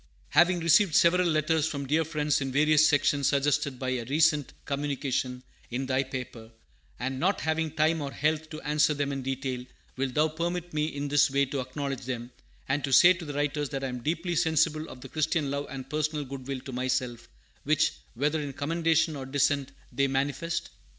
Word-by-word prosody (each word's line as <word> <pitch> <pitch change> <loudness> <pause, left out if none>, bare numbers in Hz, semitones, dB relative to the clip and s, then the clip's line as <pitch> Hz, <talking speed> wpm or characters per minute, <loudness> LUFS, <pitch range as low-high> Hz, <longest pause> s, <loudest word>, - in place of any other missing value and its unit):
Having 175 0 +4
received 165 +1 +4
several 180 +1 +5
letters 155 0 +1
from 140 -3 -4
dear 155 +4 +2
friends 150 -2 0
in 135 -1 -2
various 155 +2 +5
sections 145 -2 +2
suggested 140 -1 +1
by 130 0 -3
a 125 -2 -2
recent 150 +1 +2
communication 135 -3 -2 0.3
in 130 +3 -3
thy 130 0 +1
paper, 125 -4 -7 0.5
and 130 +1 -3
not 190 +6 +1
having 160 0 0
time 155 +1 +1
or 140 -1 -4
health 155 +2 -1
to 155 - -7
answer 150 0 +2
them 140 0 -1
in 135 -1 -3
detail, 130 -1 -3 0.3
will 135 0 0
thou 150 +5 +2
permit 170 +2 -3
me 150 0 0
in 145 -2 -4
this 145 +1 +4
way 140 +1 +2
to 135 +1 -4
acknowledge 135 0 -4
them, 120 -1 -5 0.4
and 135 +2 0
to 135 - -2
say 175 +7 +8
to 170 -2 -8
the 145 - -5
writers 145 0 -1
that 135 -2 -4
I 135 - -1
am 125 -1 -5
deeply 170 +5 -2
sensible 160 -1 +1
of 125 - -11
the 135 - -8
Christian 155 -1 0
love 140 0 -3
and 135 -1 -7
personal 150 0 -2
good 130 -1 -8
will 135 -2 -4
to 135 - -8
myself, 125 -1 -2 0.4
which, 155 +2 +2 0.2
whether 150 +5 0
in 140 -2 -5
commendation 160 +2 +1
or 135 -2 -6
dissent, 140 0 +1 0.2
they 140 0 +1
manifest? 145 +5 -2
145 Hz, 195 wpm, -28 LUFS, 135-155 Hz, 0.5 s, say